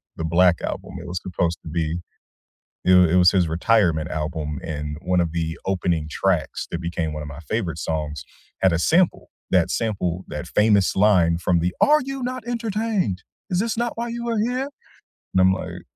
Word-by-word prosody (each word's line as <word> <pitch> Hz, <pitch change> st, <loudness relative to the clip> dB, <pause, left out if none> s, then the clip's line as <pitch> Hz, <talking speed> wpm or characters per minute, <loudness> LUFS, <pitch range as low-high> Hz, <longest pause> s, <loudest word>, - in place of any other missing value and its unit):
The -, -, -5 dB
Black 85 Hz, +2 st, +3 dB
Album, -, -, -5 dB
it 85 Hz, -, -9 dB
was 90 Hz, +1 st, -3 dB
supposed 85 Hz, -2 st, -1 dB
to -, -, -8 dB
be 80 Hz, +1 st, -1 dB, 0.9 s
it 95 Hz, -, +5 dB
was 90 Hz, -3 st, +6 dB
it -, -, +3 dB
was 90 Hz, -1 st, +6 dB
his 90 Hz, -3 st, +2 dB
retirement 85 Hz, -2 st, +2 dB
album, 75 Hz, -2 st, -3 dB
and 75 Hz, -2 st, -4 dB
one 90 Hz, 0 st, +1 dB
of 85 Hz, -2 st, +1 dB
the 80 Hz, 0 st, -2 dB
opening 90 Hz, -5 st, 0 dB
tracks 90 Hz, -1 st, -1 dB
that 85 Hz, -, -2 dB
became 85 Hz, -2 st, -2 dB
one 75 Hz, 0 st, -5 dB
of -, -, -7 dB
my 70 Hz, +1 st, -8 dB
favorite 85 Hz, -, -3 dB
songs 75 Hz, -2 st, -3 dB, 0.4 s
had 95 Hz, -, +5 dB
a 85 Hz, -, +1 dB
sample, 170 Hz, -, +2 dB, 0.2 s
that -, -, +3 dB
sample, 95 Hz, -5 st, -1 dB
that 75 Hz, +4 st, -5 dB
famous 105 Hz, 0 st, +3 dB
line 90 Hz, -5 st, +4 dB
from 85 Hz, 0 st, +1 dB
the, 90 Hz, +2 st, -1 dB
"Are 300 Hz, +1 st, +6 dB
you 270 Hz, 0 st, -5 dB
not 250 Hz, -1 st, -4 dB
entertained? 220 Hz, -, -1 dB, 0.3 s
Is 180 Hz, -1 st, +1 dB
this 225 Hz, +1 st, 0 dB
not 235 Hz, 0 st, -2 dB
why 235 Hz, +1 st, -2 dB
you 235 Hz, 0 st, -4 dB
are 230 Hz, -, 0 dB
here?" 250 Hz, +5 st, -1 dB, 0.6 s
And 95 Hz, -, +4 dB
I'm 95 Hz, 0 st, +6 dB
like 90 Hz, -2 st, -4 dB
90 Hz, 195 wpm, -23 LUFS, 80-115 Hz, 0.9 s, was